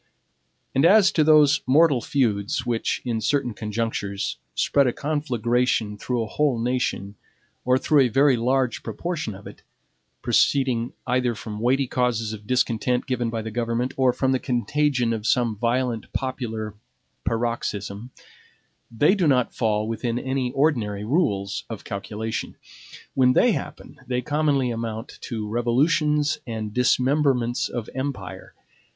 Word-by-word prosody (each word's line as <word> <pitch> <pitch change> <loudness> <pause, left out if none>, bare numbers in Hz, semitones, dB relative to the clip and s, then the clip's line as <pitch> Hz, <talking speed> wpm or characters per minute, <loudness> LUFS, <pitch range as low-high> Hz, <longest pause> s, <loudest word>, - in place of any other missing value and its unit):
And 135 - +2
as 195 +3 +6
to 155 - +3
those 150 -2 +5
mortal 145 -1 +4
feuds 115 -2 0
which, 120 -2 -1
in 115 -3 -1
certain 135 -2 0
conjunctures, 105 -2 -3 0.2
spread 140 -2 +3
a 120 - 0
conflagration 125 -6 0
through 120 +3 -2
a - - -5
whole 145 -2 +1
nation, 115 -4 -1 0.5
or 125 0 +4
through 145 +3 +3
a 130 - +5
very 135 +3 +4
large 125 +1 0
proportion 150 - -4
of 100 - -13
it, - - -11 0.6
proceeding 125 -4 +2
either 125 -1 +1
from 105 0 -7
weighty 130 +4 +2
causes 120 -3 -1
of 105 -1 -10
discontent 125 0 +1
given 125 -3 -1
by 115 -1 -3
the 110 - -5
government 120 +2 -1
or 130 -1 +3
from 130 +1 0
the 130 - +1
contagion 125 0 0
of 110 0 -3
some 120 -3 +2
violent 120 +1 -1
popular 115 -5 -3 0.5
paroxysm, 115 -2 -3 0.8
they 145 - +3
do 190 -6 +1
not 125 -4 +2
fall 110 -2 0
within 115 +1 -2
any 130 0 -2
ordinary 120 -9 0
rules 105 - 0
of 110 -3 -7
calculation. 110 +2 -5 0.6
When 125 -1 +4
they - - +4
happen, - - -6
they 125 0 -1
commonly 145 -3 +1
amount 115 0 -5
to 110 -3 -3
revolutions 145 +6 +1
and 110 -2 -4
dismemberments 125 0 +2
of 120 -3 -5
empire. 135 +1 -5
125 Hz, 140 wpm, -24 LUFS, 110-135 Hz, 0.8 s, as